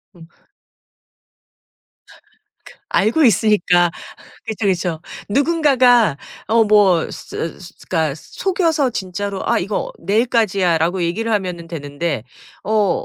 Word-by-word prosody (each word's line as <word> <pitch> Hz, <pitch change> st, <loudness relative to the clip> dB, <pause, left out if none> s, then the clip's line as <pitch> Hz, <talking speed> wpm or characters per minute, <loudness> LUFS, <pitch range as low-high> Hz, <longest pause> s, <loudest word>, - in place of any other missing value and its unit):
음. 165 Hz, -2 st, -14 dB, 1.8 s
아 -, -, -18 dB, 0.5 s
그 -, -, -18 dB
알고 230 Hz, +10 st, +2 dB
있으니까. 180 Hz, -5 st, +3 dB, 0.6 s
그쵸, 220 Hz, -1 st, -3 dB
그쵸. 180 Hz, -4 st, -1 dB, 0.3 s
누군가가 255 Hz, -, +3 dB, 0.3 s
어 225 Hz, +1 st, +4 dB
뭐 205 Hz, -5 st, +4 dB
스 165 Hz, -, -6 dB
스 185 Hz, -, -12 dB
그러니까 160 Hz, -5 st, 0 dB
속여서 325 Hz, -, -1 dB
진짜로 200 Hz, -1 st, -4 dB
"아 -, -, +3 dB
이거 200 Hz, +4 st, -3 dB
내일까지야."라고 190 Hz, -5 st, +1 dB
얘기를 205 Hz, +7 st, -2 dB
하면은 180 Hz, -5 st, -2 dB
되는데 145 Hz, -4 st, -4 dB, 0.4 s
어 210 Hz, -2 st, +1 dB
195 Hz, 235 characters per minute, -19 LUFS, 170-225 Hz, 1.8 s, 어